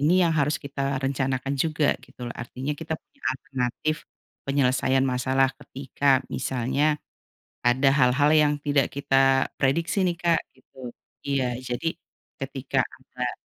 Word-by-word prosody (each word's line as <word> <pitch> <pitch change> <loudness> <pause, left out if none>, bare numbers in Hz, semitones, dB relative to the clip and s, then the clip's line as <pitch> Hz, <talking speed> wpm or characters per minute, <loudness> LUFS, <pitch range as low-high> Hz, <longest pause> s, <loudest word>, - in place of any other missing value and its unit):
Ini 150 +4 +3
yang 165 - +2
harus 150 +1 +2
kita 140 -1 -8 0.2
rencanakan 135 0 -1
juga 155 -2 +2
gitu 130 - -19
loh, 120 - -4
artinya 130 +4 -4
kita 160 +2 -4
punya 275 - -32
alternatif 130 +3 -2 0.5
penyelesaian 135 -1 +2
masalah 130 +1 +2
ketika 135 0 0
misalnya 135 +4 0 0.7
ada 130 +3 +4
hal-hal 135 +1 +4
yang 150 -1 +3
tidak 145 -2 +1
kita 135 -1 +3
prediksi 165 +7 +1
nih 175 -1 +1
Kak, 170 -2 +3
gitu. 130 - -29 0.5
Iya, 140 -2 +1 0.2
jadi 125 +6 -2 0.5
ketika 135 0 -4 0.2
agak 125 -1 -4
135 Hz, 130 wpm, -25 LUFS, 130-145 Hz, 0.7 s, ada